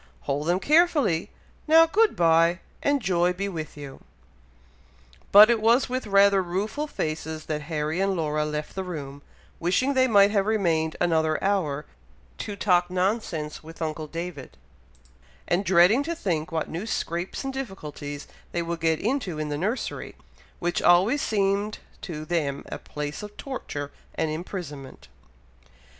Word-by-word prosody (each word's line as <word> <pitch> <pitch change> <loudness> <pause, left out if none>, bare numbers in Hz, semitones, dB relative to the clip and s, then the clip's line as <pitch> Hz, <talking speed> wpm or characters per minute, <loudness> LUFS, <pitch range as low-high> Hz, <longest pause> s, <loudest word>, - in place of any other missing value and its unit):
Hold 145 +3 -2
them 175 +2 +2
carefully! 295 - +3 0.4
Now, 325 +1 +7
good 430 +7 +2
bye, 165 +1 +3 0.2
and 285 -3 +1
joy 180 -1 +2
be 195 +2 -3
with 160 -6 -6
you." 140 -2 -9 1.3
But 210 +3 +9
it 230 -2 +1
was 235 +4 +4
with 255 -2 -3
rather 200 -1 +5
rueful 205 +12 -2
faces 155 - -4
that 150 -1 -3
Harry 155 +1 -1
and 195 0 +1
Laura 155 -2 0
left 150 0 -4
the 190 - -3
room, 145 -6 -7 0.4
wishing 220 +11 +1
they 260 -1 +4
might 200 -3 +5
have 200 -1 +1
remained 165 -7 +1
another 160 -2 +2
hour 160 -8 0 0.5
to 205 - -4
talk 180 -3 +2
nonsense 180 -5 -2
with 165 +1 -12
uncle 155 -1 -3
David, 165 -3 -7 0.9
and 175 +3 +1
dreading 190 +6 +5
to 335 +4 -3
think 170 - -2
what 160 -1 -1
new 175 +7 -5
scrapes 175 - -3
and 270 0 -3
difficulties 150 - -6 0.3
they 170 - 0
would 170 0 -4
get 160 -1 +1
into 220 - -1
in 155 -1 -3
the 145 - -2
nursery, 210 - -3 0.4
which 175 0 -1
always 190 +11 +4
seemed 200 0 0 0.2
to 155 -3 -6
them 150 -4 -1
a - - -5
place 150 0 -6
of 210 0 -9
torture 145 - -5 0.2
and 155 - -1
imprisonment. 155 - -7
175 Hz, 150 wpm, -25 LUFS, 155-210 Hz, 1.3 s, But